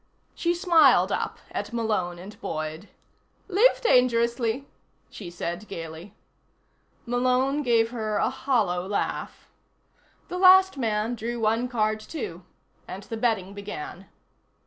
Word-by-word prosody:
She 345 Hz, 0 st, 0 dB
smiled 305 Hz, -, +5 dB
up -, -, -2 dB
at -, -, -4 dB
Malone 215 Hz, -7 st, -1 dB
and 190 Hz, +4 st, -11 dB
Boyd. 155 Hz, +5 st, -5 dB, 0.6 s
"Live 420 Hz, +6 st, +4 dB
dangerously," 240 Hz, -, +2 dB, 0.5 s
she 190 Hz, -5 st, -8 dB
said 175 Hz, +3 st, -5 dB
gaily. 165 Hz, +2 st, -8 dB, 0.9 s
Malone 255 Hz, +4 st, +1 dB
gave 230 Hz, -4 st, +2 dB
her 215 Hz, -3 st, -2 dB
a -, -, +1 dB
hollow 210 Hz, -10 st, 0 dB
laugh. 205 Hz, -, -3 dB, 0.8 s
The 360 Hz, -, -5 dB
last 380 Hz, -1 st, +7 dB
man 225 Hz, -3 st, -1 dB
drew 235 Hz, +1 st, -4 dB
one 225 Hz, +2 st, +1 dB
card, 215 Hz, -3 st, 0 dB
too, 215 Hz, -, -7 dB, 0.4 s
and 195 Hz, +2 st, -7 dB
the 225 Hz, -, -6 dB
betting 220 Hz, -5 st, 0 dB
began. 195 Hz, -2 st, -8 dB
225 Hz, 120 wpm, -26 LUFS, 195-255 Hz, 0.9 s, last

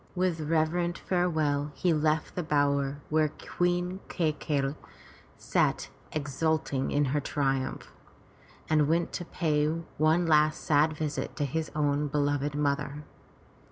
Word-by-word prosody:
With 180 Hz, -2 st, 0 dB
reverent 165 Hz, +3 st, +1 dB
farewell 155 Hz, -5 st, 0 dB
he 175 Hz, -2 st, +2 dB
left 155 Hz, 0 st, +1 dB
the 180 Hz, -, -2 dB
bower 145 Hz, -3 st, +1 dB
where 155 Hz, 0 st, +3 dB
Queen 175 Hz, +4 st, -1 dB
Kai 165 Hz, -4 st, +1 dB
key'i 145 Hz, -2 st, -1 dB, 0.6 s
sat -, -, 0 dB, 0.2 s
exulting 150 Hz, -1 st, -1 dB
in 145 Hz, 0 st, +2 dB
her 150 Hz, -, +2 dB
triumph, 135 Hz, -2 st, -2 dB, 0.7 s
and 155 Hz, -2 st, +3 dB
went 165 Hz, +2 st, +1 dB
to 175 Hz, -, -4 dB
pay 150 Hz, -4 st, +1 dB
one 165 Hz, +1 st, +1 dB
last 155 Hz, -1 st, +3 dB
sad 155 Hz, +1 st, +3 dB
visit 150 Hz, -1 st, -3 dB
to 145 Hz, -, -1 dB
his 155 Hz, +3 st, -2 dB
own 145 Hz, -1 st, +1 dB
beloved 145 Hz, 0 st, 0 dB
mother. 145 Hz, 0 st, -1 dB
150 Hz, 125 wpm, -29 LUFS, 145-160 Hz, 0.7 s, where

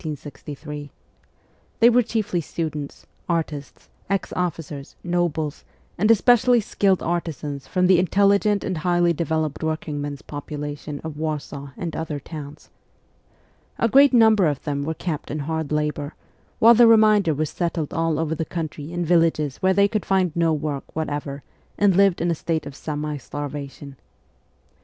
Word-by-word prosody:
They 235 Hz, +1 st, +7 dB
were 245 Hz, +1 st, +5 dB
chiefly 220 Hz, -6 st, -1 dB
students, 150 Hz, -2 st, -5 dB, 0.2 s
artists, 155 Hz, -4 st, -3 dB, 0.2 s
ex 195 Hz, -1 st, -1 dB
officers, 160 Hz, -5 st, -4 dB
nobles, 170 Hz, -4 st, -1 dB, 0.3 s
and 210 Hz, +5 st, +1 dB
especially 245 Hz, +2 st, +5 dB
skilled 195 Hz, -3 st, +1 dB
artisans 150 Hz, -5 st, -3 dB
from 180 Hz, +4 st, +1 dB
the 180 Hz, -1 st, +5 dB
intelligent 200 Hz, +3 st, +3 dB
and 185 Hz, -4 st, -2 dB
highly 175 Hz, 0 st, +2 dB
developed 160 Hz, -2 st, -2 dB
working 155 Hz, -2 st, -2 dB
men's 145 Hz, -1 st, -5 dB
population 145 Hz, 0 st, -6 dB
of 160 Hz, -2 st, -6 dB
Warsaw 145 Hz, -3 st, -4 dB
and 170 Hz, -3 st, -4 dB
other 160 Hz, -2 st, -3 dB
towns. 150 Hz, 0 st, -10 dB, 1.1 s
A 230 Hz, -, +2 dB
great 275 Hz, +4 st, +6 dB
number 220 Hz, -6 st, +5 dB
of 145 Hz, -3 st, -2 dB
them 145 Hz, -2 st, -2 dB
were 160 Hz, +2 st, -3 dB
kept 160 Hz, -3 st, -4 dB
in 150 Hz, -, -3 dB
hard 160 Hz, 0 st, -3 dB
labour, 150 Hz, 0 st, -2 dB, 0.4 s
while 230 Hz, +2 st, +7 dB
the 235 Hz, 0 st, +7 dB
remainder 215 Hz, -7 st, +5 dB
were 155 Hz, +2 st, 0 dB
settled 170 Hz, -1 st, -3 dB
all 165 Hz, -1 st, 0 dB
over 160 Hz, 0 st, -1 dB
the 160 Hz, -, -2 dB
country 160 Hz, -2 st, -5 dB
in 175 Hz, 0 st, -2 dB
villages 165 Hz, -4 st, +2 dB
where 190 Hz, 0 st, +2 dB
they 200 Hz, +1 st, +5 dB
could 215 Hz, -1 st, -2 dB
find 185 Hz, -4 st, +1 dB
no 165 Hz, -1 st, +2 dB
work 150 Hz, -2 st, -2 dB
whatever 145 Hz, -2 st, -4 dB, 0.3 s
and 200 Hz, -3 st, +4 dB
lived 195 Hz, -2 st, +4 dB
in 170 Hz, +1 st, +1 dB
a -, -, +2 dB
state 160 Hz, -1 st, -2 dB
of 145 Hz, -1 st, -8 dB
semi 150 Hz, 0 st, -4 dB
starvation. 145 Hz, 0 st, -7 dB
160 Hz, 150 wpm, -23 LUFS, 150-185 Hz, 1.1 s, They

